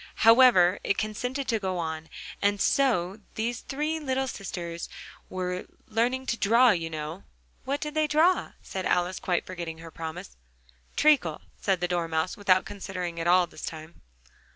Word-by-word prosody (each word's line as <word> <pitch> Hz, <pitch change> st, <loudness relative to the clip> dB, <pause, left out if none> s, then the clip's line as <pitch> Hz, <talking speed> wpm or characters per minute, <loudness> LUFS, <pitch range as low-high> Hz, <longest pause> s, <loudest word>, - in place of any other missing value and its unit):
However 225 Hz, -6 st, +7 dB
it 200 Hz, -, +1 dB
consented 250 Hz, +6 st, -2 dB
to 225 Hz, -3 st, +2 dB
go 190 Hz, -2 st, -2 dB
on. 160 Hz, -1 st, -4 dB, 0.3 s
"And 205 Hz, 0 st, +2 dB
so 210 Hz, -7 st, +2 dB, 0.2 s
these 230 Hz, +2 st, -2 dB
three 300 Hz, +3 st, -2 dB
little 265 Hz, -3 st, -1 dB
sisters 175 Hz, -6 st, -5 dB
they -, -, -14 dB, 0.4 s
were 180 Hz, 0 st, -3 dB, 0.2 s
learning 245 Hz, +4 st, 0 dB
to 235 Hz, -, -1 dB
draw, 235 Hz, +4 st, +5 dB
you 165 Hz, -4 st, -1 dB
know 155 Hz, +3 st, -5 dB, 0.2 s
" -, -, -36 dB
"What 280 Hz, +2 st, -2 dB
did 300 Hz, 0 st, -4 dB
they 310 Hz, 0 st, +2 dB
draw?" 320 Hz, +5 st, +3 dB
said 190 Hz, -2 st, -4 dB
Alice, 180 Hz, +1 st, +1 dB
quite 180 Hz, -3 st, 0 dB
forgetting 170 Hz, -3 st, -6 dB
her 165 Hz, 0 st, -10 dB
promise. 160 Hz, -, -7 dB, 0.6 s
"Treacle," 280 Hz, -, +3 dB
said 190 Hz, -3 st, 0 dB
the 175 Hz, -, +1 dB
Dormouse, 165 Hz, -1 st, -1 dB
without 190 Hz, -2 st, +3 dB
considering 180 Hz, -4 st, -5 dB
at 165 Hz, -, -2 dB
all 180 Hz, 0 st, +5 dB
this -, -, -13 dB
time. 160 Hz, +1 st, -7 dB
190 Hz, 165 wpm, -27 LUFS, 170-245 Hz, 0.6 s, However